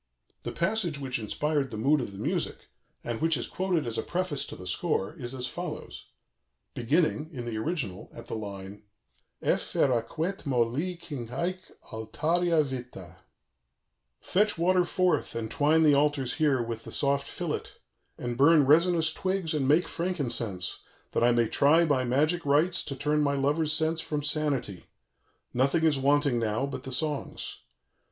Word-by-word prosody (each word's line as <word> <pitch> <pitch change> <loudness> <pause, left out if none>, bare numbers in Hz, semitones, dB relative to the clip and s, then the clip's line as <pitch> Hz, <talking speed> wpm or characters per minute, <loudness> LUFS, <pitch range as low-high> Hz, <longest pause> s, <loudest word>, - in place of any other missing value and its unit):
The - - -5
passage 175 -3 -1
which 130 -3 -3
inspired 145 +6 -1
the 110 - -6
mood 140 +6 +3
of 110 - -5
the 95 - -11
music, - - -3 0.3
and 120 -1 -4
which 165 -2 +3
is 120 - -3
quoted 185 -4 -1
as 115 -1 -3
a - - +1
preface 175 -5 -2
to - - -8
the 90 - -10
score, 95 +4 -1
is 130 -5 -6
as 125 -1 -4
follows - - -6 0.7
(beginning, 150 +5 +1
in 125 -6 -6
the 115 -2 -4
original, 115 - -3
at 115 - -11
the - - -7
line 100 -2 -7 0.6
Effer 130 - +1
aquam, 120 +7 -1
et 195 +1 -5
molli 135 +8 0
cinge 140 -9 -7
hæc 180 +8 -2 0.3
altaria 155 +9 +1
vitta): 120 - -8 1.0
"Fetch 205 +1 +2
water 180 +2 +3
forth, 185 0 0
and 115 -1 -3
twine 155 +2 +3
the 150 -2 +6
altars 140 -3 +2
here 145 -6 +2
with 115 -1 -5
the - - -9
soft 140 0 +1
fillet, - - -3 0.5
and 120 0 -4
burn 150 +1 +6
resinous 160 +2 +4
twigs 185 -3 -1
and 140 -4 0
make 155 +5 +4
frankincense, 120 - -2 0.3
that - - +1
I 120 - +6
may 120 -1 +3
try 155 +8 +4
by 135 -5 +1
magic 155 +8 +1
rites 155 +5 +3
to 140 - -4
turn 150 +2 +1
my 140 -1 +1
lover's 150 +3 +1
sense 160 +1 +2
from 150 -2 -3
sanity; 140 - 0 0.7
nothing 135 +6 +2
is 155 -4 +3
wanting 140 -2 +2
now 115 +3 0
but 140 -1 -6
the 130 - -5
songs. 145 +2 -2
145 Hz, 165 wpm, -28 LUFS, 120-160 Hz, 1.0 s, the